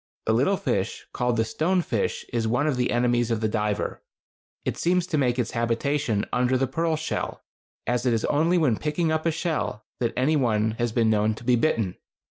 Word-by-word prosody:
A - - +2
little - - +2
fish - - -2
called 125 -1 0
the 110 - +2
stone 170 +10 +1
fish - - -2
is 115 -2 0
one 125 +6 +1
of 150 -3 +1
the 125 0 0
enemies 120 -1 +2
of 115 -2 0
the 110 - +1
diver. 105 -1 -2 0.6
It - - -1
seems 180 +1 +1
to 175 -4 -1
make 125 -3 +1
its 120 -2 -1
habitation 120 0 0
under 125 +1 +2
the 135 - +1
pearl 160 +5 0
shell, 155 +1 -3 0.4
as 120 0 0
it - - +4
is 115 -2 +1
only 165 +5 +2
when 135 -10 +2
picking 155 +2 0
up 160 +1 0
a - - +3
shell 160 -9 -2
that 120 -2 0
any 140 +5 +3
one 110 -5 +2
has 120 -1 0
been 115 -1 +2
known 105 0 +2
to 115 - -11
be 125 +1 +4
bitten. 115 - 0
125 Hz, 210 wpm, -25 LUFS, 115-155 Hz, 0.6 s, it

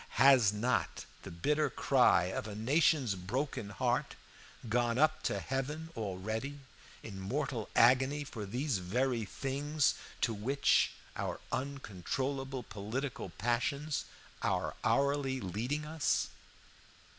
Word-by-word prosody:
Has 130 -7 +7
not 115 +5 -1 0.2
the - - -8
bitter 145 - +1
cry 125 -9 +4
of 95 +4 -3
a 105 - -6
nation's 135 +1 +3
broken 105 +4 -3
heart 105 - 0 0.5
gone 120 +1 +1
up 155 +2 +3
to - - -1
heaven 150 +5 -3
already 110 +6 -3 0.4
in 100 -3 -7
mortal 125 +3 -2
agony 130 +5 +5
for 115 -7 -7
these 125 +1 -1
very 115 +5 0
things 140 +5 0 0.3
to 115 - +2
which 130 +7 +3 0.3
our - - -3
uncontrollable 135 +1 -3
political 110 +6 -4
passions 140 +5 -1 0.4
are - - 0
hourly 135 +3 +2
leading 120 - -2
us? 155 -1 0
130 Hz, 110 wpm, -33 LUFS, 110-140 Hz, 0.5 s, Has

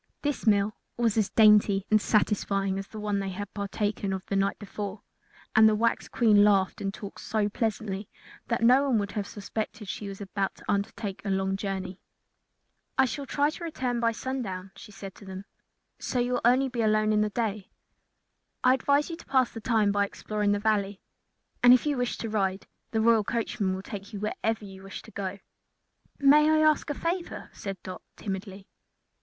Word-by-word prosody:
This 290 -5 -2
meal 205 0 +3 0.2
was 230 -3 +2
as 215 -3 +2
dainty 210 -3 +5
and 215 -1 +5
satisfying 195 -2 +1
as 195 - -6
the 215 - -9
one 210 -1 -1
they 195 -1 -2
had 195 +2 -6
partaken 200 0 -2
of 190 -1 -5
the 195 - -2
night 195 0 +1
before, 205 -1 -6 0.5
and 220 0 +8
the 215 - +2
wax 230 +2 +1
Queen 215 -4 +4
laughed 195 -2 +3
and 195 - -1
talked 200 0 -9
so 215 -2 0
pleasantly 210 -2 -2 0.4
that 230 -1 -1
no 255 +4 +6
one 245 - +3
would 200 -1 -1
have 205 -2 -3
suspected 215 +1 -5
she 200 +1 -5
was 195 -1 -7
about 195 -1 -2
to - - -16
undertake 200 0 -2
a 200 - -3
long 190 0 0
journey. 195 -2 -4 1.0
"I 265 - +6
shall 275 +3 -4
try 290 +2 +1
to 340 - -9
return 255 -7 -2
by 230 -1 +2
sundown," 220 -7 -4
she 210 - -12
said 195 -1 -9
to - - -13
them, 190 +1 -8 0.5
"so - - -3
you 245 0 +1
will 245 - 0
only 255 +3 +4
be 245 -2 -2
alone 215 -1 +3
during 210 0 +3
the 210 - +1
day. 210 -3 -3 0.9
I 255 - +6
advise 285 +4 +2
you 330 - -5
to - - -14
pass 260 -2 +3
the 225 - -8
time 220 -4 +2
by 200 0 +2
exploring 210 0 -2
the 205 - +2
Valley, 205 -2 0 0.6
and 245 0 +9
if 255 - -1
you 295 -1 +1
wish 245 -1 -1
to 230 - -4
ride, 195 -3 -1 0.2
the 220 - 0
royal 225 -1 +4
coachmen 215 -3 -1
will 190 - -6
take 205 +1 -8
you 205 - -4
wherever 215 0 -2
you 190 -1 -11
wish 195 0 -8
to 220 - -14
go." 195 -1 -4 0.8
"May 295 +2 +6
I 310 0 +4
ask 305 -1 +2
a 290 - -1
favor?" 340 +3 -3
said 195 -1 -6
Dot, 185 -1 -7
timidly. 195 -1 -6
210 Hz, 195 wpm, -28 LUFS, 195-235 Hz, 1.0 s, and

